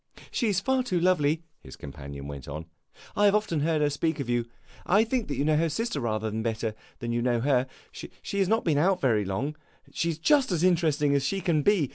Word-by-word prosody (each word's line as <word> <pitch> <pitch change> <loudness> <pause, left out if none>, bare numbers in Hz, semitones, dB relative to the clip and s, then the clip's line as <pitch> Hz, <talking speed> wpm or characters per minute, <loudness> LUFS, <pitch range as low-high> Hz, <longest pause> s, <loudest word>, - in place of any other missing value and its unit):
"She 235 -5 0
's 190 - +1
far 265 +5 +1
too 190 -8 -1
lovely," 165 -3 +2 0.2
his 65 - -12
companion 70 0 -8
went 70 -2 -8
on. 75 +3 -6 0.5
"I 205 - +3
have 200 0 +5
often 210 -7 0
heard 155 +1 +1
her 145 - +3
speak 160 +2 -1
of 140 - -3
you. 120 -1 0 0.4
I 205 +4 +4
think 230 - -2
you 140 0 -1
know 155 0 +3
her 165 +1 +2
sister 225 -1 -2
rather 110 -3 -2
better 110 0 -2 0.2
than 120 -1 -4
you 120 0 0
know 120 -1 +1
her. 130 -1 +2 0.2
She 200 - -7
has 195 - +3
not 225 +3 +1
been 155 -4 +2
out 185 +3 +3
very 115 - +2
long. 130 +11 -2 0.4
She 170 - 0
is 160 - -2
just 270 - +3
as 170 -2 0
interesting 160 -5 +3
as 140 -1 +2
she 195 +8 -1
can 165 -4 +1
be. 180 -3 +3
150 Hz, 225 wpm, -27 LUFS, 120-185 Hz, 0.5 s, have